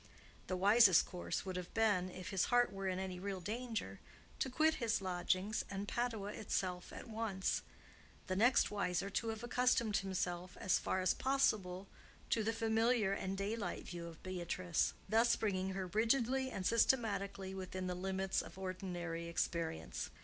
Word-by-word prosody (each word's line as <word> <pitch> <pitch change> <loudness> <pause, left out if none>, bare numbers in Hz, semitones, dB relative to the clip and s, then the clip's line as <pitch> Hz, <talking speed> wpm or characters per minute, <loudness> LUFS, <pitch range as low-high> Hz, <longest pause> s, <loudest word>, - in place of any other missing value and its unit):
The 185 - -1
wisest 200 -1 +7
course 180 +1 -4
would 185 -1 -4
have 180 -1 -6
been, 205 -5 +2
if 185 +1 -7
his 190 -2 +2
heart 245 -3 +3
were 195 0 -3
in 185 -1 0
any 185 -1 -4
real 195 0 -3
danger, 225 +5 -4 0.4
to 265 - 0
quit 310 +5 +3
his 230 -1 +2
lodgings 190 +3 0
and 200 +1 -4
Padua 220 -4 -2
itself 185 -4 -2
at - - -8
once; 220 -4 -1 0.6
the 185 - -2
next 235 +5 +4
wiser, 200 -1 -1
to 230 - -1
have 225 0 -3
accustomed 240 -3 +2
himself, 185 -2 -3
as 185 - +2
far 190 - 0
as 185 - +3
possible, 200 -9 +1 0.4
to 225 - +3
the 225 - +1
familiar 225 -1 +2
and 195 -1 -3
daylight 205 +2 -3
view 170 -1 -6
of 165 -1 -11
Beatrice—thus 185 +5 +1
bringing 190 -3 -1
her 190 0 -2
rigidly 240 +6 +2
and 195 -6 -4
systematically 200 -5 +1
within 185 -1 -4
the 180 - -1
limits 190 +1 -1
of - - -11
ordinary 180 -3 -4
experience. 165 - -2
195 Hz, 155 wpm, -37 LUFS, 185-225 Hz, 0.6 s, wisest